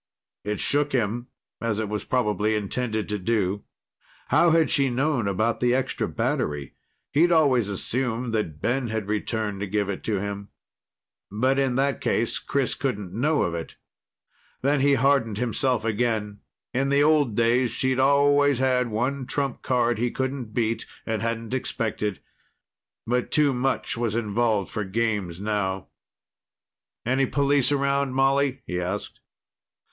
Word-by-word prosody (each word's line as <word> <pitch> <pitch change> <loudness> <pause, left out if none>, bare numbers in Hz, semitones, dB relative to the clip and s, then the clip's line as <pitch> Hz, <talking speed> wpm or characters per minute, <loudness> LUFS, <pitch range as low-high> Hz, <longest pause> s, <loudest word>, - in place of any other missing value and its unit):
It 105 0 -3
shook 145 0 +1
him, 120 0 -1 0.3
as 115 -3 -1
it 110 -1 -1
was 105 0 -4
probably 105 -3 +1
intended 110 +1 -2
to 105 0 -2
do. 100 -1 -1 0.6
How 170 - +5
had 165 -1 +3
she 140 -2 +3
known 125 -2 0
about 110 +4 0
the 125 0 +2
extra 130 0 -1
battery? 115 - -2 0.4
He'd 170 +4 +4
always 135 -10 +3
assumed 120 +3 -1
that 85 -9 -2
Ben 125 - 0
had 110 -2 -3
returned 105 -1 -2
to 100 - -3
give 100 0 -1
it 100 - -4
to 105 -3 0
him. 100 0 -5 0.8
But 130 +7 +1
in 135 -2 +1
that 135 +1 +1
case, 115 +1 0
Chris 140 -2 -1
couldn't 105 -9 -3
know 145 +8 +1
of 85 - -1
it. 85 -1 -6 0.9
Then 140 +1 +3
he 140 +1 +4
hardened 130 -5 +2
himself 125 +1 0
again. 110 -2 -1 0.3
In 135 +2 +1
the 140 +1 +4
old 145 -7 +3
days, 120 +2 +3
she'd 130 +2 0
always 140 0 +4
had 125 -1 +2
one 125 +4 -2
trump 135 0 -2
card 120 -3 +1
he 120 +1 +1
couldn't 130 0 -3
beat 115 0 -1 0.2
and 110 -1 -2
hadn't 115 +1 -3
expected. 110 -5 -2 0.8
But 125 +1 0
too 150 -3 +3
much 130 -1 -1
was 115 -2 -1
involved 110 -2 0
for 105 - -2
games 100 -4 -1
now. 100 -2 -2 1.2
"Any 130 +2 +2
police 140 0 +2
around, 140 -1 +1
Molly?" 135 0 +2
he 90 0 -2
asked. 95 +4 -4
120 Hz, 150 wpm, -25 LUFS, 105-135 Hz, 1.2 s, How